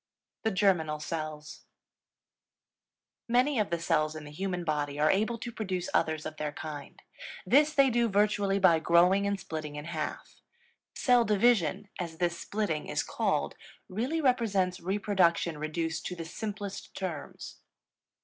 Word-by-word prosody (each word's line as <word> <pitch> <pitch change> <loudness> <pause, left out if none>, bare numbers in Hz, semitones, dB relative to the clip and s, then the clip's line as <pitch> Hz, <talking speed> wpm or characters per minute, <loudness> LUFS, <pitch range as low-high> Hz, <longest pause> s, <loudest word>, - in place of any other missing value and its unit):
THE 220 - +1
GERMINAL 180 -7 +2
CELLS. 155 -1 -5 1.7
Many 250 +2 +3
of 210 - +1
the 170 - 0
cells 155 -2 +1
in 155 - -7
the 150 - -10
human 180 +2 -3
body 145 -2 -2
are 155 +1 +4
able 215 +4 +1
to 240 +1 -6
produce 190 -6 -3
others 155 -1 +1
of 155 0 -6
their 150 -1 -2
kind. 150 -2 -8 0.4
This 295 +10 +4
they 275 -2 +5
do 235 0 +2
virtually 205 -1 +2
by 180 -4 +5
growing 180 +5 +4
and 200 -1 -1
splitting 155 -5 -6
in 150 0 -6
half; 160 -2 -5 0.6
cell 245 -3 +4
division, 210 -4 +2
as 165 -3 -4
this 170 -1 0
splitting 200 -8 -2
is - - -1
called, 70 - -1 0.3
really 250 - -2
represents 205 - +1
reproduction 180 -4 +1
reduced 160 +1 -2
to 180 - -5
the 165 -1 -6
simplest 200 +3 -6
terms. 175 -6 -6
180 Hz, 145 wpm, -29 LUFS, 155-210 Hz, 1.7 s, they